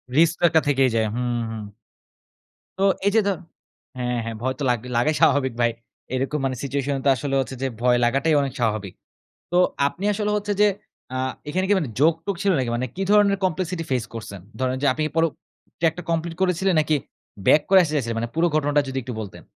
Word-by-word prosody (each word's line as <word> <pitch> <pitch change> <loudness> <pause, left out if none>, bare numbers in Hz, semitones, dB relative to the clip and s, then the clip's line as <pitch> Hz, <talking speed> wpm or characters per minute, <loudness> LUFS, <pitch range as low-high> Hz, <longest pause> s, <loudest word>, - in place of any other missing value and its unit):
Risk 165 +2 +4
তো - - -7
একটা 160 - +4
থেকেই 135 -2 +3
যায়। 110 -1 +2
হুম, 120 -1 -1
হুম। 110 -1 -5 1.2
তো - - +2 0.2
এইযে 210 +2 +4
ধ - - +3 0.7
হ্যাঁ, 125 -1 -1
হ্যাঁ। 115 -1 -4
ভয় 130 +1 0
তো - - -2
লাগবে 125 0 -1
লাগাই 150 +7 +2
স্বাভাবিক 130 -3 +3
ভাই। 120 0 +3 0.4
এরকম 135 +4 -1
মানে 130 -1 -1
সিচুয়েশন 140 0 -1
তো 140 - +5
আসলে 135 +3 -2
হচ্ছে 130 0 -5
যে 135 - +1
ভয় 125 0 +4
লাগাটাই 135 +6 +2
অনেক 135 -2 -3
স্বাভাবিক। 105 -5 -1 0.6
তো 175 - +2 0.3
আপনি 180 +7 -5
আসলে 210 0 -1
হচ্ছে 205 0 -3
যে 210 - +7 0.5
আ - - -1 0.3
এখানে 185 +4 0
কি - - +5
মানে 150 -8 -3
জোক-টোক 165 +5 +2
ছিল 200 - +3
নাকি? 125 - -1
মানে 125 +2 -2
কি 195 - -2
ধরনের 205 -1 +5
কমপ্লেক্সিটি 180 -1 -2
ফেস 125 -4 0
করছেন? 100 -3 -7 0.2
ধরেন 130 0 0
যে 145 - +4
আপনি 155 - -2
পর 165 - +3 0.6
ট্র্যাকটা 165 +1 0
কমপ্লিট 165 0 -1
করেছিলেন 185 0 +2
নাকি 155 0 +1 0.5
বেক 150 - +6
করে 190 0 +7
আসতে 155 -2 -3
চাইছিলেন? 115 -5 -1
মানে 115 +1 -3
পুরো 165 +2 +3
ঘটনাটা 145 -1 +2
যদি 135 - -4
একটু 125 +1 -6
বলতেন? 100 -4 -9
145 Hz, 200 wpm, -23 LUFS, 125-170 Hz, 1.2 s, যে